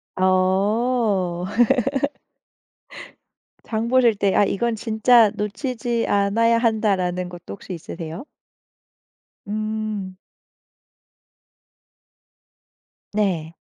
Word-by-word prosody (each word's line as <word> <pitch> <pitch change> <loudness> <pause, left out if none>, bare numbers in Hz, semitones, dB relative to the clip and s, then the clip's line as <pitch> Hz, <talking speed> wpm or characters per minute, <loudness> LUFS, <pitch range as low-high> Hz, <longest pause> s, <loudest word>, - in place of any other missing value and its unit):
어. 190 0 +1 2.2
장 225 0 -2
보실 245 -2 +4
때 200 -1 +1
아 - - +5
이건 230 +4 -1
진짜 225 +1 +4
놓치지 235 +2 -2
않아야 220 +4 +2
한다라는 195 -6 0
것도 175 -1 -9
혹시 195 -1 -9
있으세요? 165 - -7 1.2
음. 215 -2 -4 3.0
네. 175 -6 -1
210 Hz, 130 characters per minute, -22 LUFS, 185-230 Hz, 3.0 s, 아